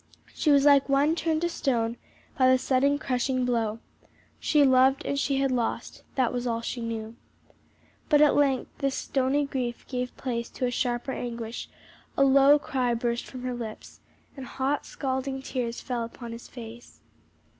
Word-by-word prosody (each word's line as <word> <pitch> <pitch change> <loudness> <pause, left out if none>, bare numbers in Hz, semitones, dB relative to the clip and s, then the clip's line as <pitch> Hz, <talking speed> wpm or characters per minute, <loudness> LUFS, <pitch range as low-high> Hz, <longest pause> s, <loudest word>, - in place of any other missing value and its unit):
She 310 - 0
was 280 -1 +5
like 280 -1 +5
one 285 +4 +3
turned 320 -1 0
to 345 - +1
stone 235 -8 -1 0.4
by 255 -2 +4
the 260 - +6
sudden 270 +2 +2
crushing 255 -2 -1
blow. 225 -3 0 0.6
She 300 -2 +3
loved 265 +1 +4
and 280 - -1
she 280 -1 0
had 270 -1 +1
lost 240 -2 -2
that 255 -3 +1
was 245 0 -2
all 230 -1 -1
she 235 +1 -4
knew. 225 -1 -5 0.9
But 295 - +5
at 300 -1 +6
length 275 -3 +1
this 275 -1 0
stony 275 +2 0
grief 250 -4 -4
gave 250 -1 -4
place 235 -3 -3
to 255 - -3
a 245 - 0
sharper 245 +1 -1
anguish, 235 -2 -5 0.5
a 275 - +5
low 275 +2 +6
cry 255 -4 -1
burst 235 0 -2
from 255 -1 -9
her 255 0 -2
lips, 230 -3 -8 0.4
and 265 -3 -8
hot 270 +2 -2
scalding 265 0 -3
tears 240 -3 -3
fell 245 -2 -3
upon 235 +1 -8
his 230 +1 -9
face. 235 -1 -11
255 Hz, 170 wpm, -27 LUFS, 240-275 Hz, 0.9 s, the